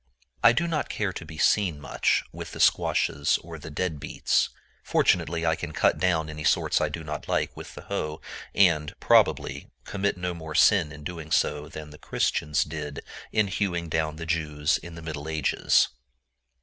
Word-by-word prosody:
I 115 - +9
do 140 +9 0
not 155 -3 -1
care 100 -3 -2
to 85 - -7
be 80 -1 -10
seen 90 -3 +2
much 75 - +1
with - - -8
the - - -8
squashes 70 0 +3
or 85 -1 -9
the 80 - -9
dead 80 0 -2
beets. - - +1 0.3
Fortunately 85 0 +1
I 80 0 +3
can - - -6
cut - - +2
down 85 -4 +1
any 75 0 -7
sorts - - +2
I - - +1
do 80 - -6
not 75 -1 -6
like - - 0
with - - -10
the - - -9
hoe, 75 0 -3 0.4
and, 80 -6 +3
probably, - - +2 0.2
commit 100 -1 -1
no 90 0 -2
more 80 -2 -7
sin 90 -6 +5
in 75 0 -10 0.3
so - - +3
doing 75 0 -10
than 75 -1 -9
the 75 - -13
Christians 75 0 0
did 75 -2 -6 0.3
in 110 -1 +3
hewing 90 -3 -2
down 80 0 -1
the 80 +1 -6
Jews 75 -2 0
in 85 0 -10
the 85 - -9
Middle 80 -1 -5
Ages. 80 -3 +2
80 Hz, 185 wpm, -26 LUFS, 75-90 Hz, 0.4 s, I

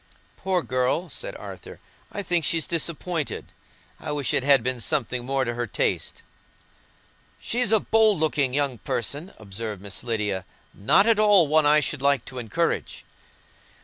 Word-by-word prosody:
"Poor 185 -3 -1
girl," 130 +7 0
said - - -6
Arthur; - - -10 0.3
"I 205 - -4
think 175 -3 0
she's 165 +2 +1
disappointed. 170 -1 -3 0.5
I - - -5
wish 145 -4 -1
it - - +3
had 135 -2 +4
been 130 -1 -1
something 125 -3 -1
more 135 +1 -1
to 120 - -2
her 120 0 -3
taste." - - -2 1.2
"She's 240 -2 0
a 220 - +7
bold 220 -1 +3
looking 150 -4 +1
young 140 -3 -1
person," 145 - -3
observed 105 0 -6
Miss 100 +1 -6
Lydia. 105 -5 -2 0.3
"Not 105 - +3
at 225 -2 +3
all 205 -5 +7
one 155 0 +3
I 150 +1 +5
should 150 -2 -2
like 140 -3 +2
to 130 -1 -7
encourage." 115 -4 -2
140 Hz, 155 wpm, -24 LUFS, 120-170 Hz, 1.2 s, a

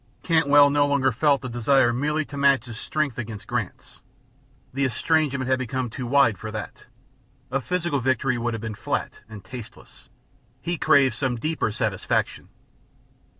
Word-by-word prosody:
Cantwell 145 -4 +5
no 145 0 +3
longer 140 -2 +2
felt 140 +4 +2
the 130 - -5
desire 120 +1 +2
merely 150 +4 -1
to 145 - -10
match 140 -3 +3
his 120 -3 -8
strength 155 -6 -2
against 110 -3 -6
Grant's; - - -5 0.7
the 140 +1 -1
estrangement 140 +1 0
had 130 0 +1
become 130 -1 -3
too 125 0 -5
wide 125 -7 +3
for 110 - -6
that; 105 -1 -7 0.7
a 135 +1 0
physical 170 -1 -1
victory 130 0 +1
would 120 0 -2
have 110 - -6
been 110 -1 -4
flat 100 - -3
and 105 -3 -10
tasteless; 120 -1 -12 0.5
he 175 - -3
craved 135 -3 +4
some 125 +2 -1
deeper 150 -1 -1
satisfaction. 105 -3 -2
130 Hz, 155 wpm, -24 LUFS, 115-145 Hz, 0.7 s, Cantwell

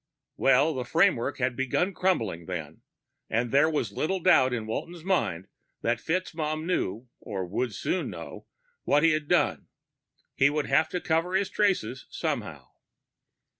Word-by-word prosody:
_ - - -61 0.3
Well, 135 +4 +4
the 130 -2 -3
framework 160 -2 +2
had 130 -1 0
begun 135 +9 0
crumbling, 110 - 0
then. 80 -4 -6 0.5
And 115 +1 0
there 145 +3 +5
was 135 -10 -1
little 185 - -1
doubt 160 -8 +5
in 115 -3 -2
Walton's 165 +9 -5
mind 105 - 0 0.4
that 115 0 +1
FitzMaugham 160 -1 -2
knew 120 - -2
or 100 -5 -4
would 105 +4 -2
soon 185 - -1
know - - -9 0.4
what 145 +2 +3
he 165 - +6
had 155 -1 -1
done. - - +1 0.7
He 140 - +4
would 150 0 -1
have 155 +2 +2
to 180 - -3
cover 165 +3 0
his 190 0 +1
traces, 180 - 0
somehow. - - -4
140 Hz, 155 wpm, -27 LUFS, 115-170 Hz, 0.7 s, he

